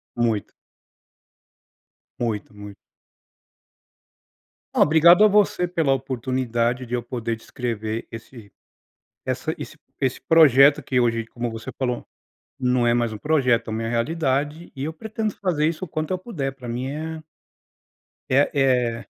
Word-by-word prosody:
Muito. 115 -3 -1 1.7
Muito, 110 -3 -3
muito. 105 -1 -10 2.0
Oh, - - +4
obrigado 170 +6 +7
a - - +7
você 200 -3 +3
pela 165 -6 +1
oportunidade 125 -1 -1
de 120 - -4
eu 120 - -1
poder 115 -1 -3
descrever 115 -1 -4
esse 115 -2 -11 0.7
essa - - -2
esse - - -8 0.2
esse 130 -2 0
projeto 145 -3 +6
que 130 -2 0
hoje 115 -2 +1
como 120 -1 -4
você 115 +4 -7
falou, 125 -2 -2 0.5
não 125 -2 +1
é 120 - +4
mais 120 -2 +1
um 110 - -6
projeto, 125 -5 +1
é - - -4
uma 110 +1 -2
realidade, 145 +5 -1
e 135 - -5
eu 160 - -4
pretendo 215 +3 -4
fazer 160 -6 0
isso 165 +3 -3
o - - -4
quanto 155 +2 -4
eu 185 - +1
puder, 160 - -4
para 125 -3 -9
mim 125 +3 -3
é 160 +2 -5 1.1
é, 135 +3 +3
é 125 -4 +1
130 Hz, 140 wpm, -23 LUFS, 115-155 Hz, 2.0 s, obrigado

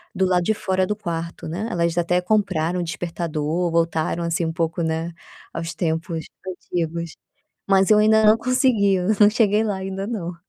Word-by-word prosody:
do 190 - +1
lado 180 -1 +2
de 220 - +1
fora 190 -2 -1
do 210 - -1
quarto, 170 -4 -5
né, 180 +8 -3
elas 170 -2 0
até 175 +1 +2
compraram 180 -4 0
o - - -1
despertador, 165 0 -2
voltaram, 165 0 0
assim, 170 +1 -1
um 160 - -2
pouco, 165 +1 -1
né, 160 +1 -2 0.4
aos 165 +1 -4
tempos 160 0 -2 0.2
antigos. 170 -2 -4 0.5
Mas 195 +1 +4
eu 210 - +7
ainda 220 0 +4
não 215 +1 +6
consegui, 230 -5 +2 0.2
não 210 -1 +7
cheguei 215 -1 +2
lá 210 -3 -1
ainda 195 +1 -4
não. 185 -7 -4
175 Hz, 170 wpm, -22 LUFS, 165-200 Hz, 0.5 s, eu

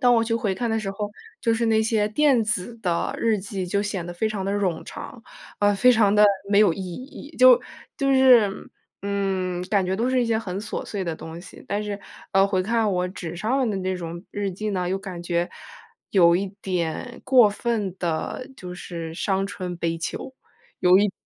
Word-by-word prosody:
当 245 -2 +5
我 230 -1 +3
去 230 0 0
回 210 -4 0
看 235 +5 -2
的 225 - +1
时 195 -2 -3
候， 205 +1 -4 0.3
就 230 -1 +2
是 230 +1 0
那 220 -1 +3
些 220 -1 +1
电 265 +1 +3
子 215 +1 -2
的 175 -5 -1
日 225 -2 +2
记 195 -1 -4
就 200 +3 0
显 195 -4 -3
得 175 - -5
非 195 +6 0
常 210 -3 -3
地 195 - -1
冗 190 -5 -1
长， 235 - -9 0.4
呃， 205 0 +4
非 250 +5 +5
常 210 -3 +4
地 210 0 +7 0.3
没 200 - +5
有 205 -5 +6
意 - - -7
义， 255 - -9
就 255 -1 +7 0.4
就 275 -3 +1
是 255 -5 +6 0.5
嗯， 190 -3 -1
感 200 -3 +3
觉 185 - -1
都 235 +3 0
是 255 -1 +3
一 - - -1
些 225 -1 +1
很 195 -4 -4
琐 215 - -4
碎 200 -3 -3
的 170 -2 -2
东 160 +1 -8
西。 - - -13
但 205 +1 -1
是， 205 -1 -4 0.3
呃， 195 +1 +5
回 190 -2 0
看 225 +1 +1
我 180 0 0
纸 175 -2 -7
上 240 +6 0
的 205 - -2
那 185 0 -1
种 170 +1 -7
日 205 -1 -2
记 210 +4 -4
呢， 180 -3 -1
又 190 +2 -1
感 185 -3 -7
觉 175 0 -1 0.6
有 170 -3 +5
一 195 +3 0 0.2
点 180 +6 -3
过 250 -5 +6
分 210 -3 -2
地 170 +9 -3
就 180 -1 -8
是 165 -2 -6
伤 195 +2 0
春 185 -3 -5
悲 165 -1 -2
秋， 260 +10 -5 0.5
有 180 0 +6
一 205 0 +3
200 Hz, 225 characters per minute, -24 LUFS, 180-225 Hz, 0.6 s, 地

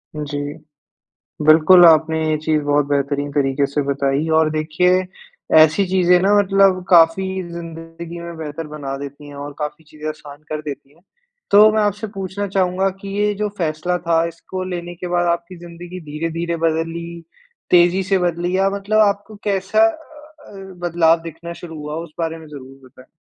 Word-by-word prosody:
जी। 145 -1 -4 1.1
बिल्कुल 165 +3 +7
आपने 160 -1 +5
ये 155 - +2
चीज़ 155 0 0
बहुत 145 0 +2
बेहतरीन 145 0 -1
तरीके 140 -1 +1
से 140 +2 -2
बताई 140 +2 -1
और 160 -1 +2
देखिए 160 +4 +1 0.6
ऐसी 155 +5 +5
चीज़ें 180 -1 +3
ना 195 +2 +3
मतलब 195 -2 +3
काफ़ी 170 +2 +5 0.3
ज़िन्दगी 165 0 -8
में 170 0 -8
बेहतर 155 0 -6
बना 145 -3 -6
देती 140 +1 -9
हैं 145 - -11
और 145 +1 -7
काफ़ी 150 +1 -5
चीज़ें 155 0 -9
आसान 150 -1 -10
कर 155 0 -3
देती 145 -2 -8
हैं। 165 - -26 0.5
तो 210 +2 +8
मैं 215 0 +1
आपसे 205 +1 -2
पूछना 195 +1 -4
चाहूँगा 190 0 +1
कि 200 - -8
ये 210 0 +2
जो 210 +1 -2
फैसला 165 +1 -1
था 165 -1 +3
इसको 175 +3 -7
लेने 175 -1 -5
के 180 +1 -6
बाद 175 0 0
आपकी 170 +1 -4
ज़िन्दगी 175 +1 -10
धीरे-धीरे 165 +2 -3
बदली, 165 +1 -2 0.5
तेज़ी 180 +2 +4
से 195 +1 +1
बदली 175 +1 -1
या 195 +1 +3
मतलब 200 +2 -1
आपको 205 +2 -3
कैसा 200 - +2
अ - - 0 0.6
अ, 195 -1 -11
बदलाव 170 -1 +2
दिखना 170 +1 -8
शुरू 165 -2 -10
हुआ? 150 0 -6
उस 165 -1 -7
बारे 165 -1 -2
में 160 -1 -13
ज़रूर 135 -2 -12
बताएँ। 130 +1 -18
165 Hz, 170 wpm, -19 LUFS, 150-185 Hz, 1.1 s, तो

